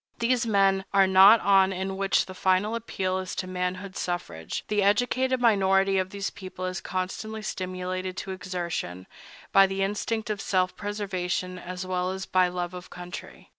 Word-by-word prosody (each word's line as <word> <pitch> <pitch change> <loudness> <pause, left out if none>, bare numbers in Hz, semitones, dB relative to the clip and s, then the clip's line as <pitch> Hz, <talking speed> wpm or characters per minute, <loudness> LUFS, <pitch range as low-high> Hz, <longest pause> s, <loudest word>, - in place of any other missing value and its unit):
These 235 0 +1
men 195 -2 +3
are 195 -1 +7
not 190 +4 +7
on 195 -1 +5
in 190 +1 -3
which 195 0 +2
the 185 - -9
final 190 +3 +1
appeal 190 -5 -2
is 185 -1 -5
to 185 - -3
manhood 185 +1 -4
suffrage, 130 - -4
the 210 -1 +1
educated 245 +6 +2
minority 195 -4 +3
of 185 0 -1
the 200 0 -4
people 185 -1 -7
is 185 0 -3
constantly 200 +4 -4
stimulated 185 -1 -4
to 190 - -5
exertion, 175 - -4 0.5
by 195 0 +7
the 195 0 -1
instinct 215 +2 -2
of 205 -2 -3
self 185 -1 0
preservation 185 -3 -3
as 180 +1 -6
well 185 0 -1
as 190 0 -4
by 185 -1 +3
love 180 0 -4
of 180 0 -9
country. 180 0 -9
190 Hz, 170 wpm, -27 LUFS, 185-200 Hz, 0.5 s, are